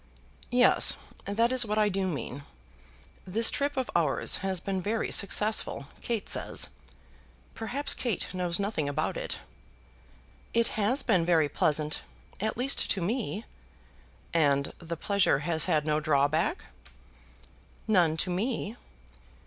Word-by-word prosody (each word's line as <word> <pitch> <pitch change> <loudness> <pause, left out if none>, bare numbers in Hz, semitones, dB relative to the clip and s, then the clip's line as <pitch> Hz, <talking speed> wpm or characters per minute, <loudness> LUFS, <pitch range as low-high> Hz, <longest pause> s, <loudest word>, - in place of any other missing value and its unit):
"Yes, 245 +1 +4 0.3
that 230 +4 +1
is 255 -1 +3
what 210 -1 -2
I 215 -1 +4
do 195 -1 -1
mean. 140 -4 -4 0.9
This 225 +5 +5
trip 285 0 -2
of 260 - -2
ours 155 -5 +2
has 190 -1 -1
been 190 +1 -3
very 215 +4 -2
successful, 210 -6 +1 0.2
Kate 230 -4 -2
says. - - 0 0.8
Perhaps 260 +6 0
Kate 235 -7 -1
knows 175 -2 0
nothing 200 -8 -1
about 150 +2 -2
it." - - -3 1.2
"It 230 0 +3
has 225 +6 +1
been 195 -8 +2
very 165 -3 +3
pleasant, 150 0 0 0.4
at 215 +2 -2
least 260 +3 +2
to 195 - +1
me." 215 +3 -2 0.9
"And 140 -4 +2
the 170 -1 -6
pleasure 200 -6 +2
has 160 -2 +2
had 155 -4 +1
no 155 0 +1
drawback?" 155 - +1 1.2
"None 175 -7 +3
to 180 - -4
me." 220 +3 -2
195 Hz, 130 wpm, -28 LUFS, 160-225 Hz, 1.2 s, This